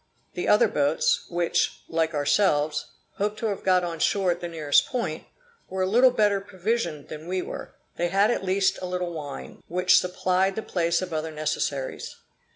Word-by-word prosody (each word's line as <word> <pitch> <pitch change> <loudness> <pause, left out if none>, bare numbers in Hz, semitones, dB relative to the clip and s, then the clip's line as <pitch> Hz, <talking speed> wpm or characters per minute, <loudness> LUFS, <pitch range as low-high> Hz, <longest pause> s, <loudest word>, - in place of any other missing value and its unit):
The - - -3
other - - +5
boats, 480 0 +1
which, 175 -1 0
like 160 -1 0
ourselves, 150 -1 +1 0.3
hoped 210 +1 -1
to 225 - -4
have 200 - -4
got 185 -1 +3
on 170 -2 -4
shore 190 +2 +2
at 175 - -3
the 175 - -3
nearest 155 -4 +2
point, 180 -11 -3 0.4
were 190 0 -1
a - - +1
little 245 +6 +6
better 205 -5 +2
provisioned 190 -5 -2
than 155 +1 -8
we 185 0 -1
were; - - -8 0.2
they 175 - +1
had 200 +5 +3
at 240 - -1
least 190 +1 +1
a 185 - -3
little 180 -1 -3
wine, 145 -3 -7
which 180 +1 +4
supplied 185 +1 0
the 220 - -3
place 170 0 0
of 180 -2 -6
other 160 0 -2
necessaries. 150 -3 -3
180 Hz, 180 wpm, -25 LUFS, 160-195 Hz, 0.4 s, little